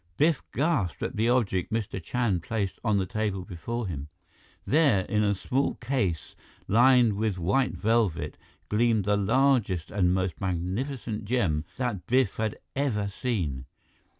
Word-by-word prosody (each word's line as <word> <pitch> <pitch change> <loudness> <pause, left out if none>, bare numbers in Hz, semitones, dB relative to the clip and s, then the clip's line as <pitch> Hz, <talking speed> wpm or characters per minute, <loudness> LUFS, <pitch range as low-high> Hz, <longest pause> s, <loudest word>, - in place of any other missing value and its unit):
Biff 155 -1 +3
gasped 140 - 0
at - - -3
the 115 +2 +2
object 105 -8 +1
Mr. 110 -4 -2
Chand 105 -1 0
placed 100 +1 -3
on 110 -4 +2
the 95 - +1
table 100 -1 -2
before 115 +7 -4
him. 75 -6 -5 0.6
There, 140 -9 +4
in 105 +3 0
a 100 -1 +2
small 130 +8 -1
case 120 - -2 0.3
lined 120 0 +5
with 105 -1 -1
white 100 +10 +1
velvet, 100 -9 0 0.3
gleamed 110 -2 +2
the 105 0 +3
largest 105 - +2
and 90 -3 +2
most 95 +1 -1
magnificent 105 +6 -3
gem 95 -10 0
that 115 -9 -3
Biff 125 -4 +2
had 110 -1 -1 0.2
ever 115 -8 0
seen. 90 - -2
105 Hz, 145 wpm, -27 LUFS, 95-125 Hz, 0.6 s, lined